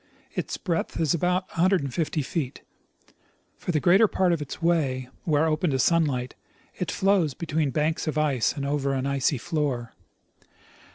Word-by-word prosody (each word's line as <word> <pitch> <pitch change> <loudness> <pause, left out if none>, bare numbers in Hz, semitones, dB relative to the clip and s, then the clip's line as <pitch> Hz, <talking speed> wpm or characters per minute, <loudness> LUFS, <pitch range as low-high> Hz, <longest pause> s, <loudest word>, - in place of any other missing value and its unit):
Its - - -3
breadth 170 -4 -2
is 160 -4 +2
about 180 +2 0
150 165 -3 0
feet. 135 -1 -4 1.0
For - - -2
the 155 - +1
greater 190 +8 +5
j^art 185 -3 +2
of 165 - -2
its 145 - -6
way, 140 -7 0 0.2
where 155 -1 +3
open 160 +2 +1
to 135 - +1
sunlight, 130 -3 +1 0.4
it - - -4
flows 190 -8 +2
between 155 -3 -1
banks 155 +4 -1
of 155 - -1
ice 145 -6 +2
and 140 - -4
over 140 -1 0
an 135 0 -1
icy 140 +1 +1
floor. 130 -4 -2
155 Hz, 155 wpm, -26 LUFS, 140-170 Hz, 1.0 s, greater